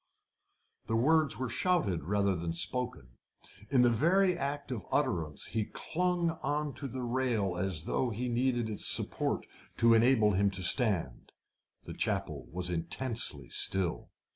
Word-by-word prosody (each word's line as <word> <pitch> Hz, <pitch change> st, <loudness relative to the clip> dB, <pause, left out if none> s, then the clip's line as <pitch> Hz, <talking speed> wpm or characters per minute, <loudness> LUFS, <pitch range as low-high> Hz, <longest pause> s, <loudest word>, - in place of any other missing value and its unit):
The 115 Hz, -, -1 dB
words 150 Hz, +1 st, +2 dB
were 130 Hz, +1 st, -3 dB
shouted 115 Hz, -, 0 dB
rather 100 Hz, +1 st, +1 dB
than 85 Hz, -1 st, -3 dB
spoken. 85 Hz, -, -3 dB, 0.6 s
In 130 Hz, -3 st, +4 dB
the 120 Hz, -, +4 dB
very 180 Hz, -, +3 dB
act 140 Hz, 0 st, -4 dB
of 115 Hz, -7 st, -4 dB
utterance 80 Hz, -4 st, -1 dB
he 110 Hz, 0 st, -2 dB
clung 175 Hz, +3 st, -1 dB
on 145 Hz, +1 st, -2 dB
to 140 Hz, -, -4 dB
the 130 Hz, 0 st, -6 dB
rail 120 Hz, -6 st, -1 dB
as 90 Hz, -3 st, -1 dB
though 125 Hz, -, -1 dB
he 120 Hz, +3 st, -3 dB
needed 120 Hz, -1 st, 0 dB
its 105 Hz, -2 st, -2 dB
support -, -, 0 dB, 0.3 s
to 115 Hz, 0 st, +5 dB
enable 115 Hz, -2 st, +4 dB
him 100 Hz, +1 st, +2 dB
to 95 Hz, -1 st, -5 dB
stand. 90 Hz, -, +2 dB, 0.5 s
The -, -, -8 dB
chapel -, -, -3 dB
was 90 Hz, +1 st, -2 dB
intensely 85 Hz, -, 0 dB
still. 95 Hz, -4 st, +2 dB
115 Hz, 145 wpm, -31 LUFS, 95-130 Hz, 0.6 s, to